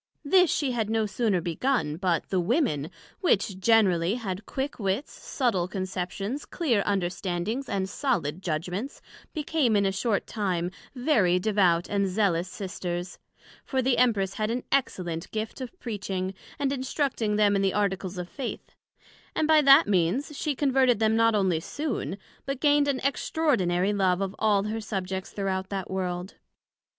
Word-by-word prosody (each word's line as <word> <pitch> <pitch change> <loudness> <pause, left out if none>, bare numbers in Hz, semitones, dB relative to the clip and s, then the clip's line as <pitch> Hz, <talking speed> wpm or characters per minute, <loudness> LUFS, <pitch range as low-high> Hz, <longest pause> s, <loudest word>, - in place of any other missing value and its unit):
This 360 +3 +5
she 280 -4 0
had 225 -3 -1
no 220 -1 +1
sooner 210 -3 0
begun, 170 - 0
but 175 -3 0
the 190 - +1
Women, 175 - +1 0.3
which 200 - +1
generally 190 -4 +3
had 200 -4 -5
quick 270 0 -3
wits, 200 +6 -1
subtile 215 -10 -1
conceptions, 190 +6 -4
clear 255 - 0
understandings, 190 +5 -1
and 190 -1 -1
solid 180 - -1
judgments, 180 - -3 0.3
became, 295 -6 +1
in 200 -1 +3
a 195 - +2
short 200 +1 0
time, 180 -5 -2 0.2
very 245 - +3
devout 180 -3 +2
and 200 -1 +1
zealous 185 -3 +1
Sisters; 180 -2 -5 0.4
for 265 - -2
the 250 -1 +2
Empress 205 -6 +2
had 215 +1 -1
an 245 +2 -2
excellent 175 -11 -1
gift 220 +4 -4
of 260 +9 -8
Preaching, 190 -4 -3 0.2
and 280 -1 0
instructing 260 -5 -1
them 205 -1 +4
in 195 - +2
the 195 -1 +1
Articles 195 -2 -1
of 180 -1 -4
Faith; 265 +5 -6 0.6
and 310 - +1
by 315 -1 +6
that 275 -4 +7
means, 205 - +1
she 295 0 -1
converted 260 -3 +3
them 220 0 +2
not 230 -1 +4
onely 190 -5 +2
soon, 280 - -3 0.3
but 275 -1 -2
gained 290 -1 +4
an 275 -2 +1
extraordinary 210 - +1
love 190 -3 +2
of 195 0 -3
all 210 -2 +3
her 220 +2 -3
Subjects 190 -2 -4
throughout 190 -1 -2
that 195 -2 -4
World. 180 0 -3
205 Hz, 155 wpm, -27 LUFS, 185-250 Hz, 0.6 s, that